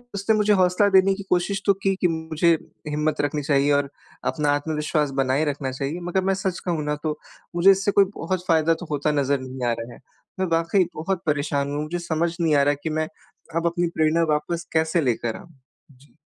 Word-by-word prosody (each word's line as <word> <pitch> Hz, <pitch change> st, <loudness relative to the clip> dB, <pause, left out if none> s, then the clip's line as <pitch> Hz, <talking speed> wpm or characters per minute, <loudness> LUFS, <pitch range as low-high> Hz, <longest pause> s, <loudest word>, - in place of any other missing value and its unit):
उसने 200 Hz, +3 st, +1 dB
मुझे 210 Hz, 0 st, +3 dB
हौसला 185 Hz, +1 st, +3 dB
देने 195 Hz, 0 st, +5 dB
की 200 Hz, -, -7 dB
कोशिश 180 Hz, +2 st, +1 dB
तो 200 Hz, -, +5 dB
की 195 Hz, 0 st, +2 dB
कि 180 Hz, -, +4 dB
मुझे 160 Hz, 0 st, +1 dB, 0.4 s
हिम्मत 150 Hz, 0 st, 0 dB
रखनी 145 Hz, +1 st, -1 dB
चाहिए 140 Hz, 0 st, +2 dB
और 140 Hz, -1 st, +1 dB, 0.4 s
अपना 150 Hz, -2 st, 0 dB
आत्मविश्वास 150 Hz, 0 st, -1 dB
बनाए 135 Hz, +4 st, +1 dB
रखना 140 Hz, -2 st, -2 dB
चाहिए, 140 Hz, +5 st, -4 dB
मगर 175 Hz, +2 st, -1 dB
मैं 195 Hz, +1 st, +2 dB
सच 190 Hz, -1 st, -2 dB
कहूँ 170 Hz, -4 st, -1 dB
ना 150 Hz, 0 st, 0 dB
तो 155 Hz, -1 st, -2 dB, 0.4 s
मुझे 185 Hz, +3 st, +7 dB
इससे 195 Hz, +1 st, +1 dB
कोई 200 Hz, 0 st, +5 dB
बहुत 180 Hz, +2 st, -3 dB
फायदा 165 Hz, -1 st, +3 dB
तो 175 Hz, -, -8 dB
होता 145 Hz, +1 st, 0 dB
नज़र 140 Hz, -1 st, +1 dB
नहीं 130 Hz, -1 st, -5 dB
आ -, -, +2 dB
रहा 115 Hz, +1 st, -7 dB
है। -, -, -14 dB, 0.4 s
मैं 190 Hz, -, +1 dB
वाक़ई 165 Hz, +3 st, +2 dB
बहुत 175 Hz, +3 st, -2 dB
परेशान 145 Hz, -2 st, 0 dB
हूँ, 145 Hz, +1 st, -2 dB
मुझे 170 Hz, +3 st, -4 dB
समझ 170 Hz, 0 st, -1 dB
नहीं 160 Hz, -3 st, +2 dB
आ 140 Hz, -, +4 dB
रहा 145 Hz, +1 st, +3 dB
कि 160 Hz, -, -1 dB
मैं 155 Hz, -, -1 dB, 0.5 s
अब 165 Hz, -, -1 dB
अपनी 175 Hz, +1 st, 0 dB
प्रेरणा 160 Hz, +1 st, +3 dB
वापस 165 Hz, +3 st, -2 dB
कैसे 160 Hz, +1 st, +2 dB
लेकर 120 Hz, -4 st, -1 dB
आऊँ, 190 Hz, -3 st, -14 dB, 0.4 s
जी। 135 Hz, +2 st, -23 dB
160 Hz, 210 wpm, -23 LUFS, 145-180 Hz, 0.5 s, मुझे